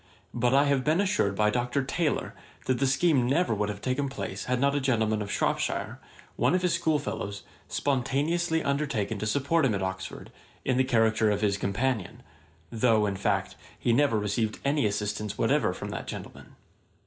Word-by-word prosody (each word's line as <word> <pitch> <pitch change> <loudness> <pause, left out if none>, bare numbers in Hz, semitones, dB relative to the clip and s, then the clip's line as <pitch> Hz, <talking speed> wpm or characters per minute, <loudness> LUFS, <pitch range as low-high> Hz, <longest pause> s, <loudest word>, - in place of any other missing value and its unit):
But 120 0 +1
I 140 +1 +5
have 140 -2 +2
been 155 +5 +2
assured 190 - +1
by 105 +1 +2
Dr. 125 +4 0
Taylor 150 +3 -1 0.3
that 130 -2 0
the 135 - +2
scheme 135 -2 +3
never 150 +1 +2
would 105 0 -1
have 100 -1 -6
taken 135 +2 -1
place 135 - -5
had 125 0 0
not 140 +1 +2
a 145 - +1
gentleman 110 -5 +1
of 100 0 -4
Shropshire, - - -1 0.4
one - - +3
of 185 - 0
his 180 - +2
schoolfellows, 150 -11 -1 0.2
spontaneously 155 +5 0
undertaken 140 -7 -1
to 110 - -2
support 140 +8 +1
him 120 -6 +2
at 95 - -2
Oxford, 95 0 -5 0.3
in 130 -2 +1
the 130 - +4
character 110 -3 +2
of 105 -1 0
his 100 -2 +2
companion; 105 +1 -2 0.5
though, 110 -2 +3
in 100 -1 -1
fact, 95 -1 -1 0.2
he 120 - +1
never 135 -3 +3
received 105 +1 -1
any 140 -4 +2
assistance 105 0 -3
whatever - - +2
from - - -6
that - - -5
gentleman. - - -9
125 Hz, 180 wpm, -28 LUFS, 105-140 Hz, 0.5 s, I